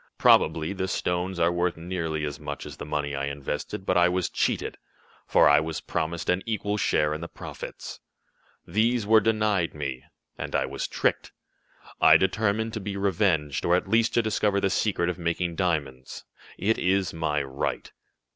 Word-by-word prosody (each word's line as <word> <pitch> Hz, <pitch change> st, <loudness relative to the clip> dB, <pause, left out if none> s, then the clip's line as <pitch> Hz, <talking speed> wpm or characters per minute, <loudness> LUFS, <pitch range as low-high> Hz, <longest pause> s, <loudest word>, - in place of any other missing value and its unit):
Probably 80 Hz, +3 st, +4 dB
the 95 Hz, -1 st, -2 dB
stones 90 Hz, 0 st, -2 dB
are 85 Hz, 0 st, +3 dB
worth 85 Hz, 0 st, 0 dB
nearly 80 Hz, -3 st, -3 dB
as 75 Hz, -1 st, -5 dB
much -, -, -6 dB
as -, -, -9 dB
the -, -, -7 dB
money 75 Hz, -1 st, -2 dB
I 70 Hz, 0 st, -2 dB
invested, 70 Hz, +6 st, -4 dB
but 90 Hz, -, +2 dB
I 90 Hz, 0 st, +5 dB
was 90 Hz, 0 st, -1 dB
cheated, -, -, -1 dB, 0.5 s
for -, -, +5 dB
I 75 Hz, -, +6 dB
was 80 Hz, 0 st, -3 dB
promised 80 Hz, +1 st, -3 dB
an 90 Hz, +1 st, +2 dB
equal 105 Hz, -2 st, -1 dB
share 75 Hz, -6 st, +1 dB
in 75 Hz, -, -5 dB
the 85 Hz, -, -5 dB
profits. -, -, -8 dB, 0.7 s
These 115 Hz, +1 st, +1 dB
were 110 Hz, +1 st, +6 dB
denied 105 Hz, -6 st, +1 dB
me, 70 Hz, -3 st, -4 dB, 0.4 s
and -, -, -4 dB
I -, -, +2 dB
was -, -, -4 dB
tricked. -, -, -1 dB, 0.7 s
I -, -, +8 dB
determined 110 Hz, +3 st, 0 dB
to 110 Hz, -, -3 dB
be 100 Hz, 0 st, -5 dB
revenged, 95 Hz, -7 st, +1 dB
or 85 Hz, -, +3 dB
at 90 Hz, -, -1 dB
least 115 Hz, +3 st, +2 dB
to 120 Hz, -, +3 dB
discover 105 Hz, -2 st, +1 dB
the 95 Hz, -1 st, 0 dB
secret 95 Hz, -4 st, +1 dB
of 90 Hz, 0 st, -3 dB
making 85 Hz, 0 st, -1 dB
diamonds. 70 Hz, -8 st, -2 dB, 0.3 s
It 110 Hz, +4 st, +1 dB
is 95 Hz, 0 st, +1 dB
my 75 Hz, -3 st, -1 dB
right." 65 Hz, 0 st, -4 dB
90 Hz, 175 wpm, -26 LUFS, 80-100 Hz, 0.7 s, I